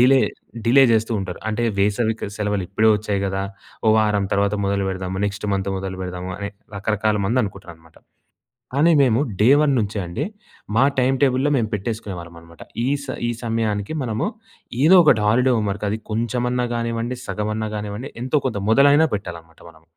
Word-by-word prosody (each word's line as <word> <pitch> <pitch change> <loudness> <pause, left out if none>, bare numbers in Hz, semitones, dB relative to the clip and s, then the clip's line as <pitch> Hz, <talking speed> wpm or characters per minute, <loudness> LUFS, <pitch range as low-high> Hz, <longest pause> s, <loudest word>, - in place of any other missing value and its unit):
Delay, 130 +2 +6 0.5
delay 135 +3 +6
చేస్తూ 110 +1 +1
ఉంటారు. 95 -2 -6
అంటే 115 +2 -2 0.2
వేసవి 110 +3 +1
క - - -3
సెలవులు 105 -2 -1
ఇప్పుడే 110 +3 +3
వచ్చాయి 105 -1 -2
గదా! 95 0 -2 0.4
ఓ - - +6
వారం 105 -2 +2
తర్వాత 100 +1 +1
మొదలుపెడదాము, 95 -1 -2
నెక్స్ట్ 100 +1 -5
మంత్ 100 0 -2
మొదలుపెడదాము 95 -1 -5
అని 100 0 -4 0.3
రకరకాల 105 +1 0
మంది 125 +5 +2
అనుకుంటారన్నమాట. 85 -5 -11 0.8
కానీ, 155 +5 +4
మేము 120 -2 +3 0.2
డే 105 - +5
వన్ 150 -2 +3
నుంచే 105 -1 -2
అండి 115 - -3 0.5
మా 125 - +5 0.2
టైమ్ 130 +1 +3
టేబుల్‌లో 135 +1 +3
మేము 110 -3 0
పెట్టేసుకునేవాళ్ళం 95 -5 -5
అన్నమాట. 85 0 -15 0.2
ఈ - - +1 0.2
స - - -11 0.2
ఈ - - +1
సమయానికి 110 +1 -1
మనము 115 - -2 0.6
ఏదో 170 +6 +7
ఒకటి 110 -8 +4
హాలిడే 125 +4 +3
హోమ్ 105 -2 0
వర్క్, 105 +1 -4
అది 110 - -2
కొంచెమన్నా 120 +2 -1
గానివ్వండి, 115 +1 -2
సగమన్నా 110 +1 -2
కానివ్వండి 105 +6 -5
ఎంతో 130 +4 +1
కొంత 115 -5 -2
మొదలైన 145 +6 +5
పెట్టాలన్నమాట 85 -5 -8
మనం. 80 -1 -21
105 Hz, 160 wpm, -21 LUFS, 100-120 Hz, 0.8 s, ఏదో